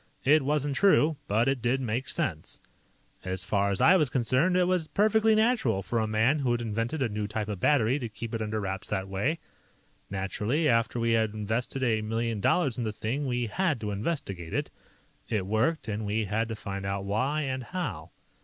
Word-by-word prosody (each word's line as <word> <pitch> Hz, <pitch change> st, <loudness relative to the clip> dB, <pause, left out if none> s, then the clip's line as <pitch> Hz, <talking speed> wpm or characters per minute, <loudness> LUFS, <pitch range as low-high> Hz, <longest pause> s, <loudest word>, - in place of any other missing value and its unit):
It 150 Hz, +3 st, +5 dB
wasn't 145 Hz, 0 st, 0 dB
true, 160 Hz, -5 st, +4 dB
but 110 Hz, +4 st, +2 dB
it 135 Hz, -2 st, +1 dB
did 120 Hz, +3 st, +1 dB
make 125 Hz, +2 st, -2 dB
sense. 135 Hz, -, -3 dB, 0.6 s
"As 95 Hz, 0 st, -3 dB
far 100 Hz, -1 st, +1 dB
as 100 Hz, -, -1 dB
I 180 Hz, -, +7 dB
was 150 Hz, -6 st, +2 dB
concerned, 130 Hz, +9 st, +2 dB
it 180 Hz, -, +4 dB
was 180 Hz, -3 st, +1 dB
perfectly 220 Hz, +3 st, +3 dB
natural 220 Hz, -, +2 dB
for 115 Hz, +4 st, -1 dB
a 110 Hz, -, 0 dB
man 110 Hz, +7 st, +2 dB
who 130 Hz, -4 st, 0 dB
had 120 Hz, -, 0 dB
invented 115 Hz, +5 st, -2 dB
a -, -, +2 dB
new 105 Hz, -1 st, -3 dB
type 105 Hz, 0 st, -3 dB
of 105 Hz, -3 st, -4 dB
battery 130 Hz, +2 st, +3 dB
to 120 Hz, -4 st, -4 dB
keep 115 Hz, +2 st, -7 dB
it 115 Hz, -, -2 dB
under 110 Hz, 0 st, -2 dB
wraps 95 Hz, -1 st, -4 dB
that 95 Hz, 0 st, -2 dB
way. 100 Hz, +12 st, -1 dB, 0.7 s
"Naturally, 105 Hz, +10 st, -1 dB
after 115 Hz, -1 st, +2 dB
we 115 Hz, 0 st, +1 dB
had 110 Hz, -2 st, +1 dB
invested 110 Hz, +5 st, -2 dB
a 110 Hz, -3 st, +2 dB
million 115 Hz, 0 st, -2 dB
dollars 140 Hz, -, +2 dB
in -, -, -1 dB
the 110 Hz, -, -1 dB
thing, 125 Hz, +7 st, -3 dB
we 120 Hz, -1 st, 0 dB
had 155 Hz, -, 0 dB
to 105 Hz, -1 st, -3 dB
investigate 100 Hz, -, -3 dB
it. -, -, -2 dB, 0.6 s
It 105 Hz, -4 st, 0 dB
worked, 115 Hz, -, 0 dB
and 110 Hz, 0 st, -3 dB
we 105 Hz, +1 st, -1 dB
had 110 Hz, +3 st, -1 dB
to 110 Hz, -, -3 dB
find 100 Hz, -2 st, -6 dB
out 100 Hz, 0 st, -3 dB
why 130 Hz, +10 st, 0 dB
and 130 Hz, -2 st, -3 dB
how." 180 Hz, +7 st, -4 dB
115 Hz, 205 wpm, -28 LUFS, 105-145 Hz, 0.7 s, I